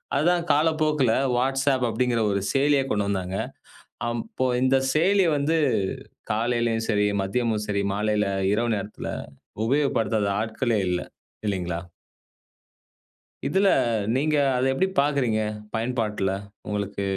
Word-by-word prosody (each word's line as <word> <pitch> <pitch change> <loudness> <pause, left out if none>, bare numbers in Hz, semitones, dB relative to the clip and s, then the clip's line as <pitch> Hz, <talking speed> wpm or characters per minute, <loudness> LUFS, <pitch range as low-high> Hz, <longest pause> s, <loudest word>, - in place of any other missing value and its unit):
அதுதான் 170 +4 +2
காலப்போக்கில 155 -4 +2 0.2
வாட்ஸ்அப் 135 +1 +1
அப்படிங்கிற 120 +1 0
ஒரு 100 0 +1
செயலியா 140 0 +3
கொண்டு 105 -5 0
வந்தாங்க. 95 -1 -2 0.7
அப்போ 130 - -3 0.2
இந்த 130 +1 +3 0.2
செயலி 190 +5 +3
வந்து 145 +3 +1 0.7
காலையிலயும் 115 0 0
சரி, 105 -2 +2
மதியமும் 110 +2 -1
சரி, 100 -1 0
மாலையில, 105 +1 +1 0.3
இரவு 115 +2 +1
நேரத்தில 105 0 -5 0.6
உபயோகப்படுத்தாத 115 -5 +1
ஆட்களே 110 +1 0
இல்ல. 90 0 0 0.5
இல்லைங்களா? 90 -4 -2 1.7
இதுல 195 +1 +2 0.5
நீங்க 150 +3 +1 0.2
அத 130 +1 +2
எப்படி 185 +8 +1
பார்க்கிறீங்க? 135 -7 +1 0.3
பயன்பாட்ல. 110 -4 -1 0.4
உங்களுக்கு 100 -1 -3
120 Hz, 105 wpm, -25 LUFS, 105-140 Hz, 1.7 s, செயலியா